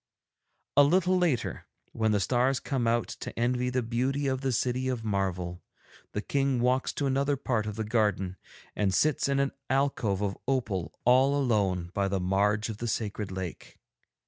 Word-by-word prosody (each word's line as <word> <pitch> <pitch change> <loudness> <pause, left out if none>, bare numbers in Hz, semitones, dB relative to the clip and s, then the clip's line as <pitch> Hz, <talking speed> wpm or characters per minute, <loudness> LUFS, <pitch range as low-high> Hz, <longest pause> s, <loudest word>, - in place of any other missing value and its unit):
'A - - +10
little 180 +5 +3
later, 175 -9 0 0.2
when 110 -1 +1
the 105 - +2
stars 125 +5 +2
come 130 -5 -1
out 115 0 +1
to - - -8
envy 125 +1 +1
the 125 0 0
beauty 130 +5 -1
of 130 -1 0
the 135 -1 0
City 125 +2 0
of 125 -3 -2
Marvel, 95 -4 -2 0.5
the 105 - -2
King 135 -2 +1
walks 125 +2 +1
to 145 - -2
another 140 +1 +1
part 120 -5 -1
of 105 - -4
the 110 - -2
garden 105 -4 0 0.4
and 95 -3 +1
sits 150 +2 +2
in 140 0 +2
an 140 0 +1 0.2
alcove 130 -7 +1
of 100 -1 -1
opal 110 -10 -1
all 130 +3 +5
alone 95 -9 +1
by 100 0 +1
the 95 0 -1
marge 100 +3 +1
of 110 -2 -5
the 120 - -4
sacred 105 -2 -3
lake. 95 -2 -6
120 Hz, 175 wpm, -28 LUFS, 100-135 Hz, 0.5 s, A